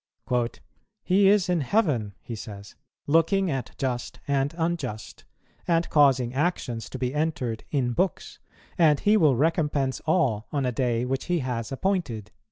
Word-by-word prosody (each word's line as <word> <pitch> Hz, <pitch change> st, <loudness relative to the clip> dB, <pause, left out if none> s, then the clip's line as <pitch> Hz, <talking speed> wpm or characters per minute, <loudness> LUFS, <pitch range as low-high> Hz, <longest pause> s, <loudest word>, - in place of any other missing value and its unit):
"He 195 Hz, +2 st, +4 dB
is 200 Hz, -2 st, +4 dB
in 175 Hz, -3 st, +1 dB
heaven," 130 Hz, -, 0 dB
he 120 Hz, -, -7 dB
says, 100 Hz, -2 st, -9 dB, 0.3 s
"looking 165 Hz, +4 st, +2 dB
at 135 Hz, -2 st, -4 dB
just 125 Hz, -2 st, -3 dB
and 140 Hz, 0 st, +1 dB
unjust, 160 Hz, -10 st, -3 dB, 0.4 s
and 170 Hz, -1 st, +2 dB
causing 135 Hz, -5 st, +4 dB
actions 135 Hz, -6 st, -2 dB
to -, -, -6 dB
be 125 Hz, 0 st, -2 dB
entered 150 Hz, -7 st, -2 dB
in 125 Hz, -4 st, 0 dB
books; 185 Hz, +5 st, -2 dB, 0.4 s
and 155 Hz, -4 st, +5 dB
He 210 Hz, +1 st, +3 dB
will 155 Hz, -10 st, +4 dB
recompense 145 Hz, -2 st, +1 dB
all 130 Hz, -, +1 dB
on 140 Hz, -3 st, 0 dB
a 125 Hz, -, +1 dB
day 120 Hz, -1 st, 0 dB
which 130 Hz, +1 st, -2 dB
He 175 Hz, -3 st, 0 dB
has 125 Hz, -3 st, -3 dB
appointed." 135 Hz, -, -2 dB
140 Hz, 150 wpm, -26 LUFS, 125-165 Hz, 0.4 s, and